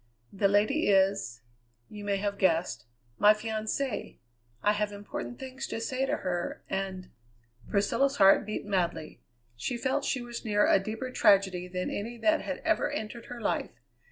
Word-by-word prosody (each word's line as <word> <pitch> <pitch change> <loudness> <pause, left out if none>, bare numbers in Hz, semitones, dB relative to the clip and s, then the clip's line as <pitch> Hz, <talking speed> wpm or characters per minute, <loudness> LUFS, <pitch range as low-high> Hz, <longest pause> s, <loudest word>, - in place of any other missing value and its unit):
"The 200 +1 +3
lady 210 +10 +2
is 195 - +2 0.5
you 210 -1 -9
may 200 -1 0
have 200 0 -2
guessed 165 - +1 0.3
my 210 +1 +7
fiancée. 220 +3 -3 0.5
I 210 - +4
have 210 0 -1
important 205 +4 -6
things 265 0 -6
to - - -4
say 260 +3 -1
to - - 0
her, 175 -2 -3
and 190 -1 -4 0.3
" 115 0 -25
Priscilla's 240 +7 +2
heart 195 -4 +6
beat 215 0 -4
madly. 175 -6 -2 0.3
She 240 - -3
felt 260 +2 0
she 255 -2 -1
was 240 -1 -7
near 210 -2 +3
a - - +5
deeper 220 +6 -5
tragedy 190 -5 +3
than 180 0 -3
any 230 +4 -4
that 320 +6 +2
had - - -5
ever - - +2
entered 225 +2 -5
her 245 - -7
life. - - -2
205 Hz, 165 wpm, -29 LUFS, 190-235 Hz, 0.5 s, my